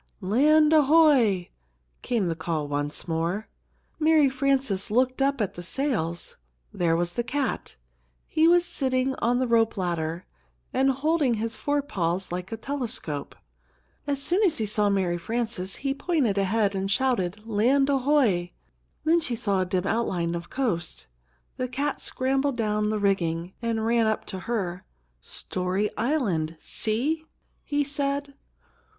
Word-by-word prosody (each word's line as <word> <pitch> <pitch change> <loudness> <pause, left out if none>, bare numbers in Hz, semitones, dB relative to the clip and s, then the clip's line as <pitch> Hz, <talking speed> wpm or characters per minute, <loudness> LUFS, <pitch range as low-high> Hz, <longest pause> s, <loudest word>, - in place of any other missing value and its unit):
"Land 300 +10 +4
ahoy!" 285 - +5 0.5
came 230 -5 0
the 165 -2 -1
call 160 -3 -2
once 145 +3 -3
more. 170 +6 -1 0.5
Mary 310 -3 +4
Frances 265 -7 +1
looked 255 +4 +1
up 275 0 +2
at 200 -3 -1
the 175 - -8
sails. 175 - -2 0.4
There 170 -2 +1
was 175 +1 -1
the 240 - -1
cat. 275 +2 -2 0.5
He 315 +1 +3
was 350 +1 +5
sitting 260 -5 0
on 240 +1 +1
the 255 - +1
rope 230 -2 +2
ladder, 170 -2 -2 0.5
and 265 +1 +3
holding 280 -1 +1
his 225 +1 -2
forepaws 195 -11 -1
like 180 +1 -4
a 225 - -3
telescope. 225 - -3 0.7
As 280 -1 0
soon 350 +8 +1
as 380 -7 +3
he 220 - -1
saw 210 0 +2
Mary 185 -3 0
Frances, 220 -1 -2
he 275 0 -2
pointed 280 - 0
ahead 200 +1 +1
and 195 0 -2
shouted, 210 -4 0
"Land 240 +6 +3
ahoy!" 260 -11 +2 0.5
Then 330 +2 +4
she 250 -6 -2
saw 200 -4 0
a - - 0
dim 185 0 -1
outline 185 -6 0
of 170 0 -5
coast. 205 -11 -2 0.5
The 255 - -1
cat 275 +3 -2
scrambled 270 0 0
down 210 -2 0
the 215 - 0
rigging, 180 -3 0
and 225 -2 -1
ran 230 -1 +3
up 220 - -1
to 190 - -4
her. 185 -6 -2 0.4
"Story 185 - -2
Island! 205 - 0
See!" 265 +9 -1 0.4
he 290 0 0
said. 280 0 -2
225 Hz, 145 wpm, -26 LUFS, 185-275 Hz, 0.7 s, ahoy